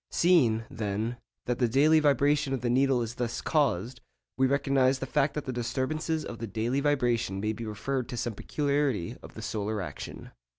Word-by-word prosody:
Seeing, 130 -11 +3
then, 110 +3 -3 0.3
that 125 -1 -1
the 125 - +3
daily 150 +7 +5
vibration 145 -1 +2
of 130 - -2
the 120 -1 0
needle 130 -1 +3
is 115 0 -5
thus 120 -1 -3
caused, 125 - 0 0.3
we 130 +1 +3
recognise 135 -1 +2
the 135 - -4
fact 140 +2 +1
that 150 - -3
the 130 - -3
disturbances 140 +7 -2
of 115 - -7
the 115 - -4
daily 115 +6 -1
vibration 120 -8 +1
may 105 +2 -1
be 115 0 -6
referred 125 +4 -3
to 120 - -5
some 120 -1 -2
peculiarity 140 - -1
of - - -13
the - - -7
solar 105 0 -2
action. 80 -8 -7
125 Hz, 185 wpm, -28 LUFS, 115-140 Hz, 0.3 s, daily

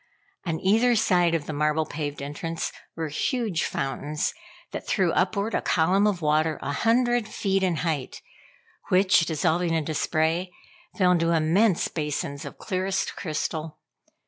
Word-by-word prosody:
On 160 -1 -1
either 225 +5 +3
side 180 -6 +3
of 155 -3 -2
the 155 - -5
marble 150 +1 +1
paved 145 -2 -5
entrance 165 +4 -4 0.2
were 160 -1 -3
huge 210 - -1
fountains 145 +3 -2 0.4
that - - -6
threw 185 -5 +2
upward 200 +5 0
a - - +1
column 185 +5 +3
of 185 -5 -1
water 155 +1 +2
a - - -2
hundred 240 - +2
feet 195 -3 0
in 185 -3 +1
height, 150 -6 -3 0.7
which, 185 -3 +4
dissolving 165 +2 +1
into 160 -1 -1
spray, 160 +4 0 0.5
fell 185 -3 +4
into 170 -1 +2
immense 170 +5 +3
basins 150 -1 -3
of 140 - -8
clearest 190 +1 -2
crystal. 155 -1 -3
165 Hz, 145 wpm, -25 LUFS, 155-190 Hz, 0.7 s, which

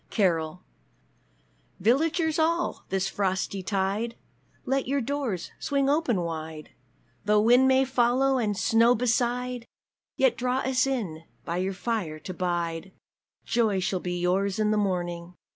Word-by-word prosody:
_ - - -41
CAROL 175 -4 0 1.2
Villagers 315 - +2
all, 335 +2 0
this 190 0 0
frosty 190 0 -1
tide, 200 +4 -1 0.5
Let 270 0 0
your 280 +2 +1
doors 255 -8 -3
swing 280 -1 +1
open 275 - +1
wide, 160 -2 -6 0.5
Though 210 0 +4
wind 245 +4 +5
may 265 0 +4
follow, 260 +1 +2
and 210 -4 -1
snow 230 +2 +4
beside, 245 +1 0 0.5
Yet 260 -3 +3
draw 250 +1 0
us 265 0 +1
in 185 -12 -3 0.2
by 170 - -2
your 190 +2 -1
fire 195 -8 -2
to 170 +4 -7
bide; 175 0 -2 0.5
Joy 220 -5 +1
shall 185 0 -1
be 180 0 -3
yours 185 +3 0
in 215 -1 +2
the - - +2
morning! 175 -3 -2
215 Hz, 140 wpm, -27 LUFS, 180-255 Hz, 1.2 s, wind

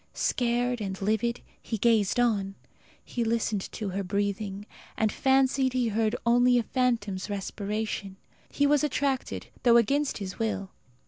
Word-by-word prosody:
Scared 245 0 0
and 195 -2 -4
livid, 220 +4 0 0.2
he 225 - -3
gazed 220 -1 +2
on. 200 -5 +1 0.5
He 240 - -2
listened 225 -3 -1
for 210 -3 -4
her 195 +2 -2
breathing, 200 +1 -2 0.3
and 220 -1 +2
fancied 265 0 +2
he 250 -2 +1
heard 220 +1 +1
only 245 +1 +5
a 240 - +2
phantom's 220 -7 -1
respiration. 205 0 -4 0.3
He 285 - +1
was 290 +1 +3
attracted, 275 -2 -1
though 235 -1 +6
against 280 +5 +2
his 195 0 -6
will. 215 -4 -2
225 Hz, 140 wpm, -28 LUFS, 200-245 Hz, 0.5 s, though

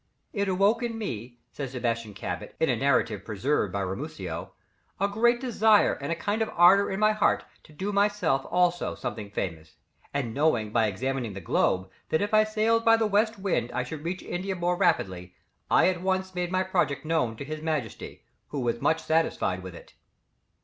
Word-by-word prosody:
"It 200 -1 0
awoke 195 +6 +3
in 235 -2 -3
me," 120 - -5
says 135 -3 -6
Sebastian 115 -4 -2
Cabot, - - -5
in - - +2
a - - +3
narrative - - +1
preserved 110 0 0
by 100 +1 -2
Ramusio, 95 +1 -5 0.5
"a 200 - +2
great 235 +4 +2
desire 220 -4 +4
and 140 +3 -5
a - - +1
kind 205 +6 -2
of 220 - 0
ardour 185 +4 +6
in 190 - -3
my 215 0 +4
heart 215 - +2 0.2
to - - -17
do 190 +7 -3
myself 200 -9 +1
also 180 -1 +1
something 105 -2 -5
famous, 80 -5 -5 0.4
and 130 -5 -2
knowing 120 -7 +1
by 115 -1 +3
examining 125 +2 -2
the 95 - -6
globe, 95 -1 +1 0.2
that 155 - +2
if 205 +1 -2
I 215 0 +6
sailed 220 +1 +1
by 225 0 +6
the 225 - +1
west 215 +2 +2
wind 180 - -1
I 125 +1 0
should 150 +4 -7
reach 175 +3 -4
India 190 +2 -3
more 175 0 0
rapidly, 95 - 0 0.3
I - - +5
at 180 -2 -2
once 190 0 -1
made 180 -1 -2
my 185 0 +2
project 155 -6 0
known 155 -8 0
to 140 - -6
His 155 +1 -5
Majesty, 155 -8 -4 0.2
who 145 - -4
was 120 -1 -1
much 160 - +1
satisfied 160 - 0
with 90 -2 -9
it." - - -14
165 Hz, 190 wpm, -27 LUFS, -, 0.5 s, ardour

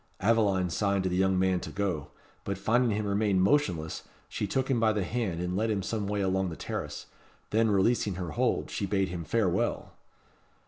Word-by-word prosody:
Aveline 100 -4 +2
signed 100 0 +1
to 95 - 0
the - - 0
young 95 0 +2
man 95 -1 +2
to - - -7
go; 90 -8 -2 0.4
but 100 -1 -3
finding 115 +1 +2
him 105 - -2
remain 100 -1 +1
motionless, 90 - +1 0.3
she 105 - -3
took 130 +6 0
him 130 -4 +1
by 110 -1 +4
the 105 -2 0
hand, 95 -4 -2
and 90 +1 -2
led 110 +3 0
him 100 -3 0
some 105 0 -2
way 105 0 -1
along 95 -1 +1
the 80 - -6
terrace. - - -5 0.5
Then, 110 +1 +3
releasing 100 0 +2
her 90 -3 -4
hold, - - 0
she 100 - -2
bade 95 -1 +1
him 85 -1 -4
farewell! 95 +2 0
100 Hz, 195 wpm, -29 LUFS, 90-110 Hz, 0.5 s, by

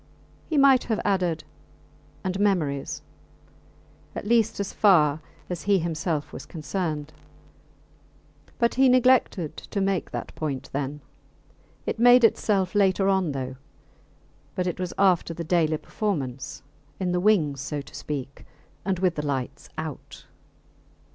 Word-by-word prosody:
He 315 - 0
might 275 -2 +6
have 220 -3 0
added, 180 -5 +1 0.8
and 190 0 -2
memories, 160 -9 0 1.1
at - - -5
least 225 -1 +2
as 200 - -3
far 155 -7 +4 0.3
as 180 -2 -4
he 200 - +6
himself 165 -2 -2
was - - -8
concerned; 155 -2 -3 1.4
but 235 0 +2
he 265 +1 +5
neglected 250 - +3
to 200 - -5
make 195 -2 0
that - - -6
point 140 -4 -4
then. 140 +1 -3 0.8
It - - -3
made 245 +1 +7
itself 195 -4 +2
later 195 -1 +3
on, 190 -5 +2
though; 130 -1 -4 1.0
but 180 - -1
it 180 0 -2
was 180 -1 -2
after 180 -4 +3
the 170 - -4
daily 160 -2 +2
performance 140 - -4 0.4
in 185 -2 0
the 180 - +1
wings, 165 -9 +2
so 145 +1 -3
to - - -15
speak, 140 -2 -6 0.4
and 190 -1 0
with 180 -1 +2
the 150 -2 -3
lights 135 0 -3
out. 155 -3 -7
180 Hz, 135 wpm, -25 LUFS, 150-200 Hz, 1.4 s, made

